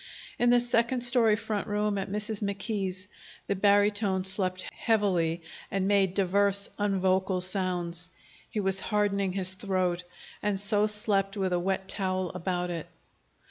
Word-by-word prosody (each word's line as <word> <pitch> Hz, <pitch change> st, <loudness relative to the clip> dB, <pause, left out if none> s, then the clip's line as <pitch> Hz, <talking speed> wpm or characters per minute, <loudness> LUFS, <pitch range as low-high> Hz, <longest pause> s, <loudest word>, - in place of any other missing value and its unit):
In 245 Hz, -, +3 dB
the 245 Hz, 0 st, +5 dB
second 240 Hz, +1 st, +1 dB
story 240 Hz, -3 st, +5 dB
front 210 Hz, -2 st, -3 dB
room 210 Hz, -1 st, -1 dB
at 195 Hz, -, -4 dB
Mrs. 210 Hz, +1 st, -2 dB
McKee's, 200 Hz, -2 st, -3 dB, 0.4 s
the 200 Hz, -, -1 dB
barytone 205 Hz, -1 st, +2 dB
slept 185 Hz, -1 st, -1 dB
heavily, 180 Hz, -7 st, 0 dB, 0.3 s
and 195 Hz, 0 st, -1 dB
made 195 Hz, -2 st, +2 dB
divers 200 Hz, +1 st, +3 dB
unvocal 190 Hz, -2 st, +1 dB
sounds. 180 Hz, -2 st, -1 dB, 0.4 s
He 215 Hz, -, -3 dB
was 195 Hz, -1 st, +2 dB
hardening 200 Hz, -2 st, 0 dB
his 185 Hz, -1 st, +2 dB
throat, 185 Hz, -2 st, -1 dB, 0.4 s
and 205 Hz, -1 st, -1 dB
so 205 Hz, +1 st, +2 dB
slept 205 Hz, -1 st, +1 dB
with 190 Hz, -2 st, -1 dB
a 175 Hz, -, +1 dB
wet 190 Hz, +1 st, -2 dB
towel 185 Hz, -3 st, -1 dB
about 180 Hz, 0 st, -3 dB
it. 165 Hz, -2 st, -5 dB
195 Hz, 140 wpm, -28 LUFS, 185-210 Hz, 0.4 s, the